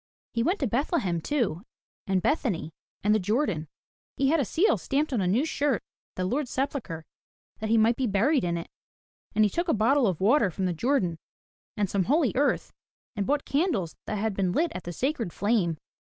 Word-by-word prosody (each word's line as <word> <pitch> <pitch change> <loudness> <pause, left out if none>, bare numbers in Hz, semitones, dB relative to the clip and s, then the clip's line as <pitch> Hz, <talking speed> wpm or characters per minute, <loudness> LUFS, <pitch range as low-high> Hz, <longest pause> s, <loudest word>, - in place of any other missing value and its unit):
He 230 - 0
went 355 - +1
to - - +2
Bethlehem 235 - 0
too, 195 - -1 0.5
and 190 -1 +1
Bethany, 215 - 0 0.3
and 210 +1 +4
the 215 - +3
Jordan. 205 - 0 0.5
He 270 0 +2
had 325 +2 +3
a 275 - +1
seal 345 - +2
stamped 290 +1 -1
on 230 - +1
a 185 - +1
new 230 - +2
shirt 290 -4 +1
at - - -14
the 185 - -1
Lord's 260 +7 -1
sepulchre 255 - -3 0.5
that 220 - -3
he 225 - +4
might 225 +2 +4
be 260 - 0
buried 230 +8 +2
in 170 -1 0
it, 170 - -7 0.6
and 215 - +5
he - - +2
took 345 +1 -1
a 320 - +3
bottle 240 +4 +3
of 180 -5 -1
water 215 +2 +4
from 185 +2 -3
the 180 - 0
Jordan, 180 - 0 0.6
and 205 -1 +1
some 190 0 0
holy 290 0 +3
earth, 285 +3 +1 0.4
and 200 -2 -2
bought 290 0 +1
candles 270 - 0
that 215 - -2
had 215 +1 -1
been 190 -2 0
lit 330 - +1
at 180 - -7
the 175 - -4
sacred 245 - -2
flame. 200 -6 +1
220 Hz, 205 wpm, -27 LUFS, 185-280 Hz, 0.6 s, and